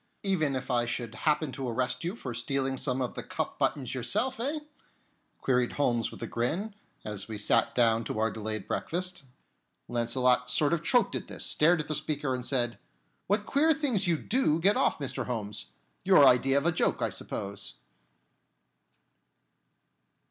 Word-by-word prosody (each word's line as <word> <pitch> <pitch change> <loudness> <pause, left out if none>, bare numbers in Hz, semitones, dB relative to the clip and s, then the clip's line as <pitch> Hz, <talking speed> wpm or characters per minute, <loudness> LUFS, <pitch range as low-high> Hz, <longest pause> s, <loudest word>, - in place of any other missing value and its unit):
"Even 160 -8 +1
if 130 0 -4
I 120 -1 +2
should 115 -1 -3
happen 150 +3 0
to 130 -2 -4
arrest 125 +1 -1
you 175 +5 -3
for 130 - -6
stealing 135 +3 -1
some 130 -1 -1
of 125 - -4
the - - -5
cuff - - -4
buttons 135 -4 0
yourself, 250 - 0
eh?" 290 +6 -2 0.8
queried 125 -2 +1
Holmes 120 -5 +1
with - - -9
a - - -1
grin, 160 - -2 0.3
as 105 -2 -2
we 110 -2 -5
sat 105 - +2
down 115 -2 +3
to - - -4
our 110 +1 +1
delayed 110 -1 -5
breakfast. 180 -2 -2 0.6
Launcelot 125 +1 +1
sort 145 +5 +2
of 170 -1 -1
choked 245 +6 +3
at - - -4
this, - - -3
stared 165 +2 +3
at 150 - -9
the 155 - -1
speaker, 150 -2 -1
and 125 -1 -3
said: 120 -2 +1 0.5
"What 205 +1 +1
queer 310 +5 +3
things 250 - +1
you 170 -2 +2
do 190 - +1
get 195 +5 +4
off, - - +2
Mr. 140 -3 -3
Holmes! 105 - -4 0.4
Your - - +7
idea 135 +2 +5
of 140 - +1
a 170 - +4
joke, 160 - 0
I - - 0
suppose." 100 0 -5
135 Hz, 170 wpm, -29 LUFS, 120-170 Hz, 0.8 s, Your